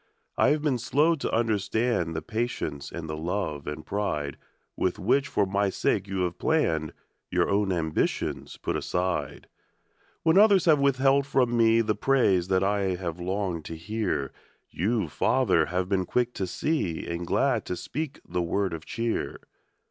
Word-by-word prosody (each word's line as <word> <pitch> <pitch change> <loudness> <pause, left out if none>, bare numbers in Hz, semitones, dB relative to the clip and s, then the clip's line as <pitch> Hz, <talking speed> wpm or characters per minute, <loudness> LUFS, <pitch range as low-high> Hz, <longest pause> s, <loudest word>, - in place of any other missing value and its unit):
I - - +4
have 150 0 +1
been 135 -5 +1
slow 150 +7 +3
to 155 - -3
understand 110 -5 0
The 80 - -3
patience 110 -10 -3
and 85 -1 -6
the 80 - -4
love 80 -2 -3
and 75 +1 -5
pride 75 -9 -2 0.4
"With 90 - 0
which 135 +9 +2
for 105 -6 +1
my 100 +1 +1
sake 100 +1 0
you 95 -1 -2
have 90 -1 -1
hour 80 - -1
own 100 -1 +1
ambitions 80 -3 -1
put - - -3
aside. 90 -1 -2 0.8
from 160 - +6
me 140 - +4
The 110 -2 -1
praise 100 -10 +3
that 95 0 +2
I 100 +1 +1 0.2
have 90 -2 -5
longed 90 -2 -2
to 80 - -6
hear, 90 -6 -2 0.4
Y>u, 105 +2 0
Father, - - +2
have 90 +1 -1
been 95 -1 0
quick 125 0 0
to 95 - -3
see 95 - -1
Ar^d 85 0 -3
glad 110 +5 +1
to 90 - -3
speak 150 - -5
the 90 +1 -1
word 95 +2 -1
of 80 -1 -6
cheer. 115 0 -2
100 Hz, 150 wpm, -27 LUFS, 85-120 Hz, 0.8 s, from